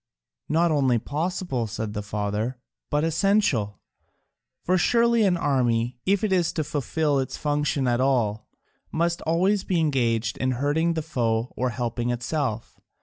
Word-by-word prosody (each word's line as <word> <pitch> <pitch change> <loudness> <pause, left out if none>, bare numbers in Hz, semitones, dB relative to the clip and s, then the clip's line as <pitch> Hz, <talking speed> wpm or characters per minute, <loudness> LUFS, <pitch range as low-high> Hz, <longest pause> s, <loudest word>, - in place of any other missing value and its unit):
"Not 165 +2 +3
only 135 -5 +3
possible," 150 - -2
said 105 0 -4
the 105 - -3
father, 105 +4 -3 0.3
"but 150 +1 +1
essential. 165 - +1 0.8
For 185 - +2
surely 235 +4 +3
an 180 -3 +2
army, 125 -5 0
if 200 +2 +2
it 205 -3 +1
is 175 -3 +2
to 155 - -1
fulfil 145 0 0
its 130 - -3
function 145 -2 0
at 120 0 +1
all, 120 -6 +1 0.4
must 170 +1 0
always 185 +5 +2
be 180 -4 0
engaged 120 -7 0
in 130 0 +1
hurting 150 +6 +1
the 160 - -2
foe 120 -6 -1
or 130 0 0
helping 120 +1 -2
itself. 125 -1 -3
140 Hz, 145 wpm, -25 LUFS, 120-165 Hz, 0.8 s, Not